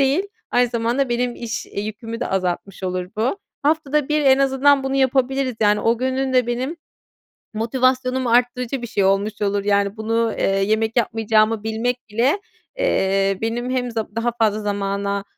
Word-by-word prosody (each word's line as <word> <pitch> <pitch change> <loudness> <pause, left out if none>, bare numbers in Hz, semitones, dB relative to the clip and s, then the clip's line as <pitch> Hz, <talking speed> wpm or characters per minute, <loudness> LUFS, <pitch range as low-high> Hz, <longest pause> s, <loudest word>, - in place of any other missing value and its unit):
değil, 275 +6 +3 0.3
aynı 245 0 +3
zamanda 235 +3 0
benim 240 0 -1
iş, 230 -1 -5
iii, 200 - -5
yükümü 225 +2 -6
de - - -1
azaltmış 190 +1 -2
olur 180 -1 -2
bu. 245 - 0 0.2
Haftada 300 -1 +1
1 300 0 +2
en 265 0 +6
azından 275 +1 +3
bunu 270 0 -1
yapabiliriz 265 0 +1
yani. 210 -1 +3
O 230 0 +2
günün 260 +1 -1
de 250 -2 +3
benim 255 +7 -2 0.8
motivasyonumu 255 +2 +1
arttırıcı 245 +1 +1
bir - - -3
şey 205 -3 0
olmuş 200 +2 +1
olur. 200 0 0
Yani 200 0 +1
bunu, 225 +1 0
eee, - - 0
yemek 215 +4 +1
yapmayacağımı 220 -1 +2
bilmek 225 +3 -1
bile, 250 - +1 0.4
eee, 195 - +1
benim 235 +2 -2
hem 250 -1 -1
z - - -12
daha 230 +2 -1
fazla 215 -1 +2
zamana, 200 -1 -2
230 Hz, 165 wpm, -21 LUFS, 210-260 Hz, 0.8 s, en